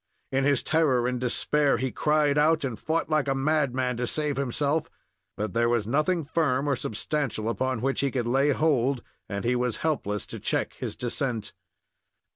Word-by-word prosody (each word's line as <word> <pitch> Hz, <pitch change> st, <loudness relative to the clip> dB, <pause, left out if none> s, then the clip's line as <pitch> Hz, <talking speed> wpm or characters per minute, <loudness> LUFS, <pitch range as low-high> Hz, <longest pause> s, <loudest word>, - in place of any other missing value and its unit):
In 135 Hz, 0 st, +1 dB
his 140 Hz, -3 st, +2 dB
terror 140 Hz, -7 st, +2 dB
and 125 Hz, -1 st, -2 dB
despair 140 Hz, +3 st, +2 dB
he 130 Hz, -1 st, -2 dB
cried 150 Hz, +3 st, +2 dB
out, 155 Hz, +1 st, +3 dB
and 125 Hz, -5 st, -3 dB
fought 165 Hz, +1 st, -1 dB
like 155 Hz, -3 st, +1 dB
a 135 Hz, -, +1 dB
madman 135 Hz, -3 st, +1 dB
to 125 Hz, 0 st, -1 dB
save 150 Hz, +2 st, -1 dB
himself; 140 Hz, +4 st, 0 dB, 0.5 s
but 105 Hz, -3 st, -3 dB
there 120 Hz, 0 st, +2 dB
was 120 Hz, -3 st, +1 dB
nothing 155 Hz, -, +1 dB
firm 145 Hz, -3 st, +1 dB
or 140 Hz, -, +2 dB
substantial 120 Hz, 0 st, -2 dB
upon 130 Hz, 0 st, -1 dB
which 135 Hz, +1 st, 0 dB
he 140 Hz, -, +2 dB
could 125 Hz, -3 st, -2 dB
lay 135 Hz, +4 st, +2 dB
hold, 140 Hz, -4 st, +2 dB, 0.3 s
and 100 Hz, 0 st, -3 dB
he 125 Hz, +1 st, +2 dB
was 125 Hz, -1 st, 0 dB
helpless 105 Hz, -10 st, -1 dB
to -, -, -8 dB
check -, -, -1 dB
his -, -, -5 dB
descent. 120 Hz, -2 st, -2 dB
135 Hz, 180 wpm, -27 LUFS, 120-150 Hz, 0.5 s, out